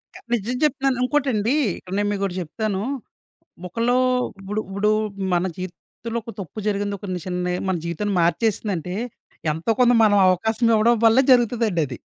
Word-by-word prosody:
క -, -, -8 dB, 0.2 s
నిజం 240 Hz, +2 st, -1 dB
చెప్తున్నాను 270 Hz, -3 st, +1 dB
ఇంకోటండీ, 255 Hz, -3 st, +1 dB, 0.2 s
ఇక్కడ 185 Hz, -, -10 dB
నేను 205 Hz, 0 st, +1 dB
మీకోటి 195 Hz, -2 st, -2 dB
జెప్తాను. 195 Hz, +4 st, -3 dB, 0.9 s
ఒకలో 230 Hz, +7 st, +1 dB, 0.4 s
ఉప్పుడు 200 Hz, +2 st, -3 dB
ఉప్పుడూ 200 Hz, +2 st, +1 dB, 0.4 s
మన 175 Hz, +1 st, +2 dB
జీవితంలో 185 Hz, +6 st, -6 dB
ఒక 230 Hz, -, -8 dB
తప్పు 190 Hz, +4 st, -8 dB
జరిగింది. 205 Hz, 0 st, -1 dB
ఒక 200 Hz, -, -8 dB
ని 180 Hz, -, -3 dB
చిన్నయ్ 180 Hz, -1 st, -2 dB
మన 190 Hz, -, +1 dB
జీవితాన్ని 190 Hz, +4 st, -2 dB
మార్చేసిందంటే, 185 Hz, -1 st, 0 dB, 0.6 s
ఎంతో 160 Hz, +8 st, -1 dB
కొంత 245 Hz, 0 st, +5 dB
మనం 205 Hz, -2 st, +5 dB
అవకాశమివ్వడం 220 Hz, +4 st, +3 dB
వల్లే 225 Hz, +4 st, +6 dB
జరుగుతదండది. 220 Hz, -, +2 dB
205 Hz, 140 wpm, -22 LUFS, 185-230 Hz, 0.9 s, వల్లే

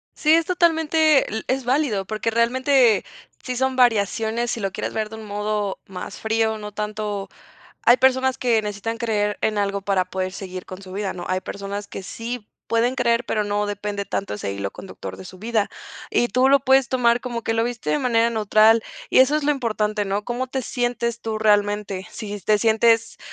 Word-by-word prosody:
Sí, 305 Hz, 0 st, +3 dB
es 330 Hz, 0 st, +4 dB
totalmente, 320 Hz, -6 st, +3 dB
e 220 Hz, -, -5 dB
es 265 Hz, 0 st, 0 dB
válido, 245 Hz, -6 st, +1 dB
porque 215 Hz, +3 st, -2 dB
realmente 245 Hz, 0 st, +3 dB, 0.4 s
sí 255 Hz, -, -3 dB
son 265 Hz, +1 st, 0 dB
variaciones, 225 Hz, 0 st, +2 dB
si -, -, -3 dB
lo 195 Hz, -2 st, -2 dB
quieres -, -, -4 dB
ver 215 Hz, -1 st, -2 dB
de 220 Hz, -, -8 dB
un 220 Hz, -1 st, -9 dB
modo 210 Hz, -1 st, -2 dB
más 185 Hz, -1 st, -7 dB
frío, 220 Hz, 0 st, 0 dB
no 210 Hz, -1 st, -8 dB
tanto 210 Hz, -1 st, -4 dB, 0.5 s
hay 240 Hz, +1 st, +6 dB
personas 260 Hz, +1 st, +3 dB
que 235 Hz, -3 st, +2 dB
necesitan 210 Hz, +2 st, -4 dB
creer 210 Hz, -3 st, 0 dB
en 215 Hz, -1 st, +1 dB
algo 200 Hz, -1 st, -1 dB
para 195 Hz, -2 st, +1 dB
poder 185 Hz, 0 st, -3 dB
seguir 185 Hz, -1 st, -7 dB
con 185 Hz, 0 st, -9 dB
su 190 Hz, -1 st, -11 dB
vida, 200 Hz, 0 st, -2 dB
¿no?, 175 Hz, -1 st, -7 dB
hay 185 Hz, 0 st, 0 dB
personas 200 Hz, +1 st, -5 dB
que -, -, -7 dB
sí 230 Hz, +3 st, -6 dB, 0.2 s
pueden 230 Hz, +2 st, +1 dB
creer, 240 Hz, -2 st, +1 dB
pero 215 Hz, -1 st, 0 dB
no 205 Hz, 0 st, -1 dB
depende 205 Hz, 0 st, -4 dB
tanto 200 Hz, -, -3 dB
ese 105 Hz, -1 st, -4 dB
hilo 100 Hz, 0 st, -4 dB
conductor 195 Hz, -, -9 dB
de 190 Hz, -, -9 dB
su 185 Hz, -, -12 dB
vida, 220 Hz, 0 st, 0 dB, 0.4 s
y 240 Hz, -, +1 dB
tú 255 Hz, +2 st, +3 dB
lo 280 Hz, 0 st, +5 dB
puedes 265 Hz, -1 st, +4 dB
tomar 240 Hz, -2 st, +2 dB
como 240 Hz, -2 st, -4 dB
que -, -, 0 dB
lo 225 Hz, 0 st, +1 dB
viste 230 Hz, -9 st, -3 dB
de 150 Hz, -, +2 dB
manera 230 Hz, +1 st, +2 dB
neutral, 220 Hz, 0 st, +4 dB, 0.3 s
y -, -, +4 dB
eso 265 Hz, +3 st, +5 dB
es 305 Hz, -, -2 dB
lo 295 Hz, -, +3 dB
importante, 215 Hz, -5 st, -1 dB
¿no?, 200 Hz, +2 st, -2 dB
¿cómo 245 Hz, +3 st, -2 dB
te 260 Hz, +1 st, -3 dB
sientes 240 Hz, -1 st, -2 dB
tú 220 Hz, -1 st, -3 dB
realmente?, 205 Hz, -2 st, +1 dB
si 205 Hz, -2 st, -6 dB
te 210 Hz, +2 st, +3 dB
sientes 225 Hz, +1 st, +2 dB
220 Hz, 200 wpm, -22 LUFS, 205-245 Hz, 0.5 s, hay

